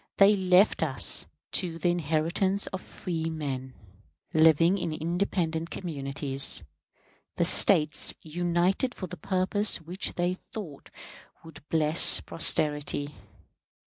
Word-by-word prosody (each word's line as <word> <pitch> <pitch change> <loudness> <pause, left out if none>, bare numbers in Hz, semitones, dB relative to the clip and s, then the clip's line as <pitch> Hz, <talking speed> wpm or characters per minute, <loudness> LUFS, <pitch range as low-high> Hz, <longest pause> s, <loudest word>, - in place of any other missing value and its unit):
They 200 +1 +5
left 185 +1 +2
us - - +3 0.2
to 170 -3 -2
the 175 - -1
inheritance 175 +4 -1
of 190 - -7
freemen, 155 -6 -5 0.6
living 165 +4 +3
in 170 - -4
independent 165 0 -3
communities, 140 -4 0 0.7
the - - 0
States 150 -1 +3
united 175 +8 -1
for 185 - -6
the 180 0 -9
purposes 195 +3 0
which 175 +4 -6
they 180 +1 -2
thought 170 -11 -9 0.5
would 160 -2 -14
bless 160 0 +6
posterity. 150 -2 -1
165 Hz, 105 wpm, -27 LUFS, 155-185 Hz, 0.7 s, bless